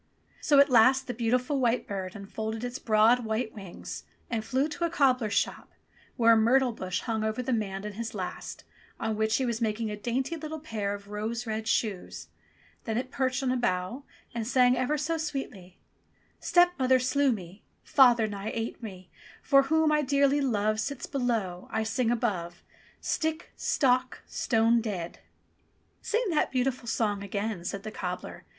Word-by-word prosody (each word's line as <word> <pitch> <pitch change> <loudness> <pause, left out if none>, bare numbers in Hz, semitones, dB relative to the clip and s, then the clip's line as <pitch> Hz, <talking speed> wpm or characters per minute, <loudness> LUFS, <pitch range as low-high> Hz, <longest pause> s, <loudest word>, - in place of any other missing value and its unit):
So 290 - +4
at 280 -1 +6
last 255 +3 +5
the 245 - -4
beautiful 250 +4 0
white 245 -1 +1
bird 190 -1 -4
unfolded 220 +3 -5
its 245 +1 -4
broad 225 +3 +4
white 220 +1 -2
wings 195 -4 -8 0.3
and 225 -2 -1
flew 260 +6 0
to 315 +3 -5
a - - 0
cobbler's 255 -8 +2
shop - - -1 0.4
where 230 -2 +6
a - - +6
myrtle 245 +3 +4
bush 185 -5 -3
hung 220 -2 -2
over 220 +3 -1
the 255 +1 -1
man 195 -3 -2
and 210 - -5
his 225 +1 -5
last, 185 -3 -6 0.4
on 220 -1 -1
which 220 +1 +1
he 265 - +1
was 235 -1 -2
mak 215 -1 0
ing 220 -2 -2
a - - -3
dainty 250 +8 -2
little 315 0 -6
pair 210 -9 -3
of 200 0 -12
rose 220 +3 -3
red 220 -1 -3
shoes. 90 - -2 0.6
Then 220 0 -1
it 255 +1 -3
perched 260 0 0
on 255 - +1
a - - +1
bough 240 0 -1 0.3
and 230 -2 -3
sang 250 0 +4
ever 255 +4 0
so 320 +3 -1
sweetly: 245 - -5 0.6
"Stepmother 350 -8 +4
slew 260 +2 +2
me, 190 -2 -6 0.2
Father 240 -4 +5
nigh 205 0 -4
ate 230 +2 -4
me, 185 -5 -9 0.4
He 280 - +1
whom 310 +3 +5
I 300 0 +3
dearly 280 +1 +2
love 215 -4 +1
Sits 280 +3 -3
below, 225 -10 -2
I 220 - 0
sing 225 +2 0
above. 195 -8 -2 0.4
Stick! 320 +1 -2
Stock! 255 -2 +1
Stone 230 0 +2
dead 190 -7 -5 0.4
!" - - -41
"Sing 460 +3 0
that 305 - +2
beautiful 255 -1 -1
song 210 -3 0
again," 200 -1 -3
said 200 +2 -4
the 215 - -6
cobbler. 180 -3 -6
230 Hz, 175 wpm, -28 LUFS, 210-260 Hz, 0.6 s, at